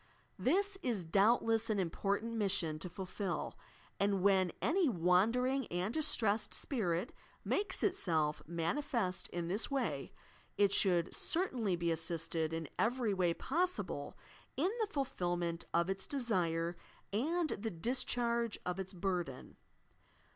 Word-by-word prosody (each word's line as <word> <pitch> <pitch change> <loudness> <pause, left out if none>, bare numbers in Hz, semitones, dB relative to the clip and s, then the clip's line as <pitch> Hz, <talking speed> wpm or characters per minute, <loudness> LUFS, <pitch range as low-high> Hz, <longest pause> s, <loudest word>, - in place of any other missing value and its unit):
This 385 +7 +2
is 230 -8 -1
doubtless 225 +5 +3
an 215 - +2
important 200 +5 0
mission 185 -8 0
to 180 - -4
fulfil, 190 +1 -3 0.4
and 200 -2 +2
when 190 -3 +4
any 340 -2 +3
wandering 230 +8 +3
and 180 +5 -1
distressed 225 -9 +1
spirit 190 - -1 0.3
makes 395 -2 0
itself 160 - +1
manifest 185 - -1
in 175 -1 -3
this 200 +6 -1
way, 275 -2 -1 0.5
it 200 -1 +5
should 175 -5 +2
certainly 250 - 0
be 170 -1 0
assisted 165 0 -1
in 165 -1 -3
every 235 -2 +2
way 180 -3 +2
possible 360 +6 -1 0.4
iq 345 +8 +2
the 435 - +2
fulfilment 175 - -1
of 170 0 +2
its 195 0 -2
desire 175 - 0 0.4
and 315 +9 +1
the 225 +3 -2
discharge 235 +3 0
of 180 +1 -2
its 190 +1 -5
burden. 175 -7 -3
200 Hz, 125 wpm, -35 LUFS, 175-245 Hz, 0.5 s, it